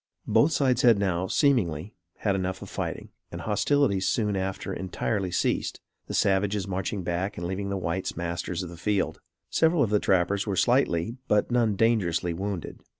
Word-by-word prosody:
Both 150 - +4
sides 130 -4 +2
had 120 -4 +6
now, 95 -2 0
seemingly, 100 - +1 0.2
had 100 - 0
enough 95 -1 -2
of - - -10
fighting, - - -4 0.2
and - - -6
hostilities 110 -2 +1
soon 105 -3 +1
after 95 0 -3
entirely 95 +1 -2
ceased, 90 - -1 0.3
the - - -4
savages 100 0 +1
marching 95 +1 -3
back 90 +4 -2
and 85 - -4
leaving 95 +2 -3
the 100 - -1
whites 90 0 -3
masters 85 +1 -3
of 90 - -7
the 85 - -10
field. 100 +3 -1 0.3
Several 160 -1 +3
of 110 - -1
the 105 - +4
trappers 95 +2 +1
were 100 - 0
slightly, 115 -3 +2
but 105 +3 +2
none 115 -4 +2
dangerously, 95 -6 +1
wounded. 95 -1 -4
95 Hz, 170 wpm, -27 LUFS, 90-110 Hz, 0.3 s, had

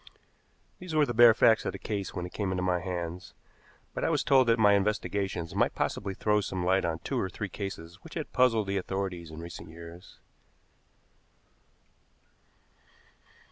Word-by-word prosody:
These 180 -3 -6
were 150 -1 +5
the 120 - -3
bare 120 -1 +8
facts 115 -1 +5
of - - -3
the - - -5
case 100 -3 -4
when 90 - -4
it 90 - -9
came 100 -3 -2
into 90 -1 -1
my 90 -1 +1
hands, 90 -1 -5 0.6
but - - -4
I - - +2
was - - +1
told 130 -2 +4
that 115 0 +4
my 105 -3 +5
investigations 100 -4 -1
might - - +1
possibly 95 -1 -2
throw 105 +1 +2
some 95 -2 -3
light 95 0 +2
on 80 -1 -1
two - - -1
or 95 - -1
three 105 +1 -5
cases 90 -3 -7
which - - -11
had - - -5
puzzled 115 -4 +3
the 100 0 -1
authorities 95 -3 -3
in 80 +1 -8
recent 85 -1 -9
years. 85 +2 -12
95 Hz, 175 wpm, -29 LUFS, 90-105 Hz, 0.6 s, bare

